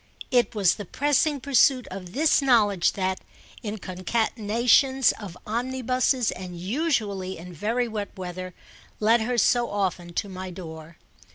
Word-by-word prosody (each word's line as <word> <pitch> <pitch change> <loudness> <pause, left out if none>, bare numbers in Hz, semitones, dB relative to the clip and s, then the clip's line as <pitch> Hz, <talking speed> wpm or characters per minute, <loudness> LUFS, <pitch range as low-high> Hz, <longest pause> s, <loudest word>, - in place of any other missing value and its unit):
It 245 -2 +2
was 195 -4 +4
the 205 - -7
pressing 290 - +1
pursuit 265 -1 +3
of 185 -2 -8
this 300 +3 +3
knowledge 210 -9 +3
that, 190 -1 -1 0.4
in 215 -2 -4
concatenations 230 +7 +2
of 185 -4 -8
omnibuses 255 +1 0
and 180 -1 -7
usually 200 - -1
in 175 +2 -10
very 230 +8 -1
wet 210 -3 -4
weather, 185 0 -6 0.4
led 225 +2 +4
her 245 +2 -1
so 240 +2 +3
often 185 -4 -2
to - - -1
my 185 -1 -7
door. 160 -3 -9
210 Hz, 135 wpm, -25 LUFS, 185-250 Hz, 0.4 s, was